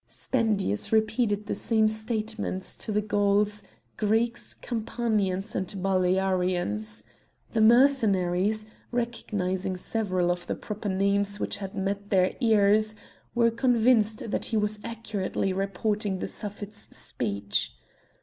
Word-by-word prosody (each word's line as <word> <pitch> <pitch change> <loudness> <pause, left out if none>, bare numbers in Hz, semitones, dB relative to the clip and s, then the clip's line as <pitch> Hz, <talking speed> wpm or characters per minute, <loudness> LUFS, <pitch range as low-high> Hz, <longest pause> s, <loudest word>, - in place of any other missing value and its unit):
Spendius 215 - 0
repeated 220 -1 +1
the - - -2
same 220 -2 +2
statements 220 -3 -2
to 220 - -5
the 210 0 +1
Gauls, 205 0 +2 0.4
Greeks, 225 +3 +1
Campanians 215 -4 -1
and 185 - -2
Balearians. 180 - 0 0.5
The 225 - +1
Mercenaries, 215 -5 +4 0.2
recognising 195 -6 -2
several 185 -3 0
of 175 0 -4
the - - -1
proper 210 -1 -5
names 200 +1 +1
which - - -2
had 195 -1 -7
met 200 +1 -2
their 185 -2 +3
ears, 215 -2 +3 0.4
were 235 -1 +4
convinced 230 -3 +2
that - - -1
he 225 - -1
was 210 0 0
accurately 210 -4 -2
reporting 195 +1 -1
the - - -3
Suffet's 205 0 -6
speech. 100 -3 -2
205 Hz, 115 wpm, -27 LUFS, 190-220 Hz, 0.5 s, Mercenaries